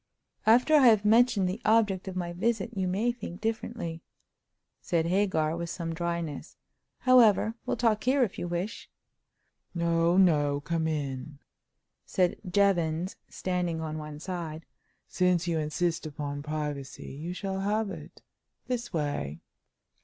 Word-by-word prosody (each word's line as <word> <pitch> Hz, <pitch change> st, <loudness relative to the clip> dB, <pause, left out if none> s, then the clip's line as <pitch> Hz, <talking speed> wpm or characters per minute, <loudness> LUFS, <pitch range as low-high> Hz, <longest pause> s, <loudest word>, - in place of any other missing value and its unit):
"After 250 Hz, +7 st, +5 dB
I 285 Hz, -4 st, +7 dB
have 215 Hz, -3 st, +5 dB
mentioned 220 Hz, -3 st, +4 dB
the 190 Hz, +6 st, -3 dB
object 210 Hz, -4 st, +2 dB
of 190 Hz, -, -5 dB
my 175 Hz, -1 st, -3 dB
visit 225 Hz, +4 st, -1 dB
you 190 Hz, -1 st, 0 dB
may 205 Hz, +7 st, +1 dB
think 235 Hz, -7 st, -8 dB
differently," 220 Hz, -6 st, -3 dB, 0.8 s
said 165 Hz, -2 st, 0 dB
Hagar, 170 Hz, -4 st, +1 dB
with 170 Hz, 0 st, -4 dB
some 165 Hz, -1 st, -4 dB
dryness. 170 Hz, -2 st, -4 dB, 0.4 s
"However, 225 Hz, -4 st, +5 dB
we'll -, -, 0 dB
talk 220 Hz, -3 st, +2 dB
here 260 Hz, +1 st, +4 dB
if 210 Hz, -, -3 dB
you 175 Hz, -, -3 dB
wish." 175 Hz, +5 st, -4 dB, 0.9 s
"No, 170 Hz, +1 st, +2 dB
no; 145 Hz, -6 st, +4 dB
come 160 Hz, +2 st, -1 dB
in," 145 Hz, -2 st, -3 dB, 0.7 s
said 180 Hz, -2 st, +1 dB
Jevons, 175 Hz, -2 st, +1 dB
standing 180 Hz, -3 st, -2 dB
on 155 Hz, -1 st, -4 dB
one 150 Hz, -1 st, -7 dB
side. 165 Hz, -2 st, -5 dB, 0.4 s
"Since 180 Hz, -2 st, +1 dB
you 165 Hz, -2 st, +1 dB
insist 165 Hz, +2 st, -1 dB
upon 145 Hz, -1 st, -5 dB
privacy, 150 Hz, -2 st, -5 dB
you 160 Hz, +6 st, -5 dB
shall 195 Hz, 0 st, -3 dB
have 205 Hz, +1 st, 0 dB
it. -, -, -10 dB, 0.4 s
This 245 Hz, -1 st, -3 dB
way." 145 Hz, -, -2 dB
175 Hz, 140 wpm, -28 LUFS, 160-205 Hz, 0.9 s, I